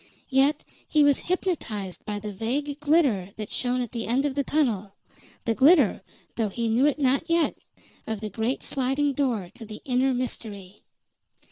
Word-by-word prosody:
Yet 275 Hz, +3 st, +3 dB, 0.2 s
he 305 Hz, -1 st, +4 dB
was 285 Hz, -1 st, +4 dB
hypnotized 230 Hz, -, -2 dB
by 210 Hz, -1 st, -3 dB
the 205 Hz, 0 st, -6 dB
vague 275 Hz, +8 st, -2 dB
glitter 285 Hz, -, +2 dB
that 215 Hz, -1 st, -7 dB
shone 250 Hz, 0 st, -1 dB
at 240 Hz, -, -7 dB
the 230 Hz, -2 st, -4 dB
end 255 Hz, +5 st, +1 dB
of 285 Hz, -, 0 dB
the 280 Hz, +1 st, 0 dB
tunnel 225 Hz, -11 st, 0 dB, 0.5 s
the 230 Hz, -, +2 dB
glitter, 275 Hz, -, +5 dB, 0.4 s
though 220 Hz, -3 st, +1 dB
he 230 Hz, +3 st, -2 dB
knew 245 Hz, +6 st, +4 dB
it 295 Hz, -, +1 dB
not 275 Hz, +2 st, +1 dB
yet, 335 Hz, -1 st, +2 dB, 0.5 s
of 220 Hz, -2 st, -2 dB
the 215 Hz, 0 st, -4 dB
great 225 Hz, +6 st, -2 dB
sliding 275 Hz, +2 st, 0 dB
door 240 Hz, -10 st, -1 dB
to 230 Hz, -, -11 dB
the 215 Hz, -1 st, -8 dB
inner 260 Hz, +1 st, +2 dB
mystery. 210 Hz, -6 st, -5 dB
250 Hz, 170 wpm, -26 LUFS, 215-285 Hz, 0.5 s, glitter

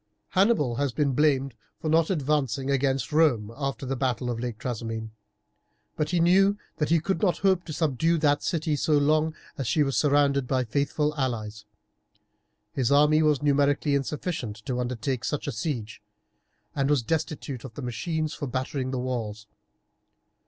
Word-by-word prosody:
Hannibal 185 Hz, -, +2 dB
has 140 Hz, -2 st, 0 dB
been 145 Hz, +2 st, +1 dB
blamed 140 Hz, -2 st, +2 dB, 0.3 s
for 160 Hz, -, -4 dB
not 160 Hz, +1 st, +3 dB
advancing 140 Hz, -, 0 dB
against 135 Hz, -1 st, 0 dB
Rome 125 Hz, -9 st, +2 dB
after 135 Hz, -1 st, -3 dB
the 135 Hz, +1 st, -2 dB
battle 125 Hz, -1 st, -1 dB
of 115 Hz, -, -4 dB
Lake 120 Hz, -2 st, -4 dB
Trasimene; 115 Hz, -2 st, -4 dB, 0.8 s
but 150 Hz, -1 st, -1 dB
he 175 Hz, +1 st, +1 dB
knew 195 Hz, +4 st, +4 dB, 0.2 s
that 150 Hz, -2 st, 0 dB
he 165 Hz, 0 st, +4 dB
could 180 Hz, +1 st, -2 dB
not 185 Hz, -4 st, +2 dB
hope 190 Hz, -2 st, +3 dB
to -, -, -7 dB
subdue 160 Hz, +1 st, +1 dB
that 145 Hz, -2 st, +2 dB
city 160 Hz, -3 st, -1 dB
so 150 Hz, +2 st, 0 dB
long 155 Hz, +2 st, +2 dB, 0.2 s
as 135 Hz, -, -2 dB
she 150 Hz, +7 st, +3 dB
was 135 Hz, -1 st, -1 dB
surrounded 140 Hz, -2 st, +3 dB
by 130 Hz, -1 st, +1 dB
faithful 145 Hz, +5 st, 0 dB
allies. 110 Hz, -5 st, -3 dB, 1.1 s
His 130 Hz, -1 st, 0 dB
army 150 Hz, +2 st, +5 dB
was 150 Hz, -2 st, +2 dB
numerically 145 Hz, 0 st, +2 dB
insufficient 135 Hz, -, -3 dB
to 125 Hz, -1 st, -2 dB
undertake 125 Hz, +1 st, -2 dB
such 150 Hz, -, -2 dB
a 145 Hz, -, -2 dB
siege, 115 Hz, -3 st, -4 dB, 0.7 s
and 140 Hz, -1 st, +1 dB
was 145 Hz, -5 st, +2 dB
destitute 145 Hz, -3 st, -3 dB
of 120 Hz, -4 st, -10 dB
the 145 Hz, -, -6 dB
machines 155 Hz, +6 st, -2 dB
for 145 Hz, -, -5 dB
battering 130 Hz, +1 st, -3 dB
the 130 Hz, -, -2 dB
walls. 115 Hz, -4 st, -3 dB
140 Hz, 165 wpm, -26 LUFS, 125-155 Hz, 1.1 s, army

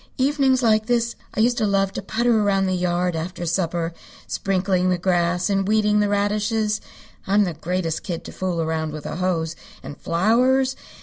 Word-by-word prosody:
Evenings 265 Hz, -1 st, +2 dB
like 215 Hz, -1 st, +3 dB
this 235 Hz, -1 st, +1 dB, 0.2 s
I -, -, +1 dB
used 240 Hz, +2 st, +2 dB
to 215 Hz, -, +1 dB
love 195 Hz, -1 st, +1 dB
to -, -, -4 dB
putter 225 Hz, +2 st, +1 dB
around 195 Hz, -2 st, +2 dB
the 185 Hz, -, 0 dB
yard 180 Hz, -1 st, 0 dB
after 175 Hz, +2 st, -4 dB
supper, 170 Hz, -1 st, -1 dB, 0.3 s
sprinkling 185 Hz, -1 st, 0 dB
the 180 Hz, -, +2 dB
grass 175 Hz, 0 st, +1 dB
and 195 Hz, -1 st, 0 dB
weeding 210 Hz, 0 st, +3 dB
the 205 Hz, -1 st, +2 dB
radishes. 210 Hz, +1 st, 0 dB, 0.5 s
I'm 205 Hz, +2 st, +4 dB
the 180 Hz, -4 st, -2 dB
greatest 170 Hz, 0 st, -2 dB
kid 175 Hz, -4 st, -5 dB
to -, -, -9 dB
fool 180 Hz, -3 st, -2 dB
around 160 Hz, -1 st, -2 dB
with 155 Hz, -1 st, -7 dB
a -, -, -4 dB
hose. 170 Hz, -3 st, -1 dB, 0.3 s
And 145 Hz, -, -7 dB
flowers! 255 Hz, -, +2 dB
195 Hz, 180 wpm, -22 LUFS, 175-215 Hz, 0.5 s, I'm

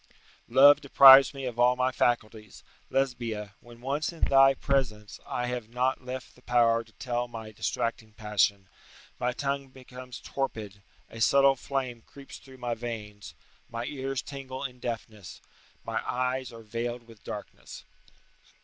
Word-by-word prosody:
["Love 140 Hz, +4 st, +7 dB
deprives 135 Hz, -1 st, +9 dB
me 135 Hz, -2 st, -7 dB
of 120 Hz, -2 st, -5 dB
all 125 Hz, +1 st, +5 dB
my 130 Hz, +1 st, +1 dB
faculties: 110 Hz, -4 st, -2 dB, 0.3 s
Lesbia, 115 Hz, -6 st, -2 dB
when 120 Hz, 0 st, -16 dB
once 140 Hz, +5 st, -2 dB
in 170 Hz, -, -14 dB
thy 135 Hz, 0 st, +6 dB
presence, 110 Hz, -7 st, -2 dB
I 125 Hz, -, -2 dB
have 125 Hz, -3 st, -4 dB
not 125 Hz, +2 st, -1 dB
left 130 Hz, 0 st, -7 dB
the 125 Hz, -, -21 dB
power 115 Hz, -2 st, +3 dB
to 110 Hz, -, -22 dB
tell 120 Hz, -1 st, -3 dB
my 115 Hz, -2 st, -8 dB
distracting 110 Hz, +1 st, -3 dB
passion: 105 Hz, -3 st, 0 dB, 0.5 s
my 125 Hz, 0 st, 0 dB
tongue 140 Hz, +1 st, -3 dB
becomes 130 Hz, -1 st, -11 dB
torpid; 110 Hz, -7 st, -5 dB, 0.3 s
a 115 Hz, -, -10 dB
subtle 140 Hz, +3 st, +5 dB
flame 130 Hz, -3 st, -4 dB
creeps 140 Hz, +4 st, -13 dB
through 130 Hz, -1 st, -15 dB
my 120 Hz, -1 st, -3 dB
veins; 110 Hz, -3 st, -7 dB, 0.3 s
my 115 Hz, +1 st, -4 dB
ears 135 Hz, -1 st, -4 dB
tingle 135 Hz, -1 st, -7 dB
in 125 Hz, -2 st, -6 dB
deafness; 110 Hz, -5 st, -6 dB, 0.4 s
my -, -, -2 dB
eyes 130 Hz, 0 st, -2 dB
are 115 Hz, -1 st, -11 dB
veiled 120 Hz, +2 st, -5 dB
with 115 Hz, -4 st, -17 dB
darkness." -, -, -9 dB
125 Hz, 150 wpm, -28 LUFS, 115-135 Hz, 0.5 s, deprives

